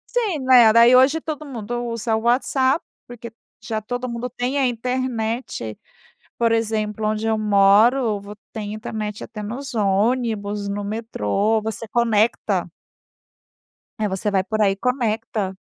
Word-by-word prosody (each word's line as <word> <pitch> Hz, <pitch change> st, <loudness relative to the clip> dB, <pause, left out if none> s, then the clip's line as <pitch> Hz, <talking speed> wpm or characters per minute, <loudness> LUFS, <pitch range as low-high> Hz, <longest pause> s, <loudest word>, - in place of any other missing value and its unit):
Sim, 425 Hz, -10 st, 0 dB
né. 245 Hz, -4 st, +7 dB
Daí 235 Hz, +2 st, +7 dB
hoje 265 Hz, +5 st, +5 dB
todo 310 Hz, -1 st, -5 dB
mundo 240 Hz, -3 st, -5 dB
usa 230 Hz, -1 st, -1 dB
o 220 Hz, -, -1 dB
WhatsApp, 260 Hz, +4 st, +1 dB, 0.2 s
porque 235 Hz, -1 st, -10 dB, 0.3 s
já 220 Hz, -2 st, -3 dB
todo 245 Hz, +3 st, -4 dB
mundo 240 Hz, +1 st, -4 dB
tem 250 Hz, +5 st, -2 dB
a 265 Hz, -, +3 dB
internet, 235 Hz, -, -3 dB, 0.6 s
por 230 Hz, -1 st, +2 dB
exemplo, 215 Hz, -1 st, -1 dB
onde 215 Hz, +1 st, -1 dB
eu 220 Hz, -1 st, +1 dB
moro, 210 Hz, +3 st, +4 dB
vo 200 Hz, +1 st, -10 dB, 0.2 s
tem 210 Hz, -2 st, -5 dB
internet 215 Hz, -1 st, -5 dB
até 210 Hz, -, -8 dB
nos 250 Hz, +6 st, -6 dB
ônibus, 210 Hz, -1 st, 0 dB
no 205 Hz, +1 st, -3 dB
metrô, 215 Hz, -, -1 dB
você 220 Hz, +1 st, -5 dB
conecta. 225 Hz, -1 st, +1 dB, 1.3 s
É, 215 Hz, -, +1 dB
você 195 Hz, +2 st, -2 dB
vai 190 Hz, -1 st, +2 dB
por 215 Hz, +2 st, -2 dB
aí 200 Hz, -2 st, +4 dB
e -, -, -2 dB
conecta. 220 Hz, -4 st, -2 dB
225 Hz, 145 wpm, -21 LUFS, 210-245 Hz, 1.3 s, né